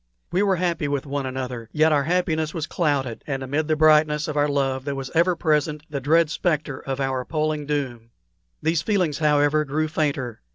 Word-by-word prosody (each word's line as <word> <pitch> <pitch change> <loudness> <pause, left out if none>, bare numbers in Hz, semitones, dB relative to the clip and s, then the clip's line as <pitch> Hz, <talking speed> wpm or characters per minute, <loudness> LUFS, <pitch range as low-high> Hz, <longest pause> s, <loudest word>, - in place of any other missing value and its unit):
We 185 - +2
were 200 -2 +3
happy 170 -4 -1
with 140 -1 -2
one 140 -1 -3
another, 125 -3 -5
yet 155 +1 +3
our 145 -2 +2
happiness 160 -2 0
was 160 -3 -2
clouded, 140 -9 -1
and 135 -2 -3
amid 145 +4 -1
the 155 - +2
brightness 150 -1 +4
of 155 - -4
our 145 0 +3
love 135 -2 0
there 140 0 -3
was 135 -1 -6
ever 175 +2 +3
present 150 -1 0
the 140 - -2
dread 160 +3 +3
spectre 155 -6 -1
of 135 0 -4
our 135 -1 -1
appalling 155 +1 -2
doom. 130 -6 -3 0.5
These 160 0 +1
feelings, 180 -6 0
however, 150 0 +3
grew 155 +2 -1
fainter. 145 - -2
150 Hz, 195 wpm, -23 LUFS, 135-155 Hz, 0.5 s, brightness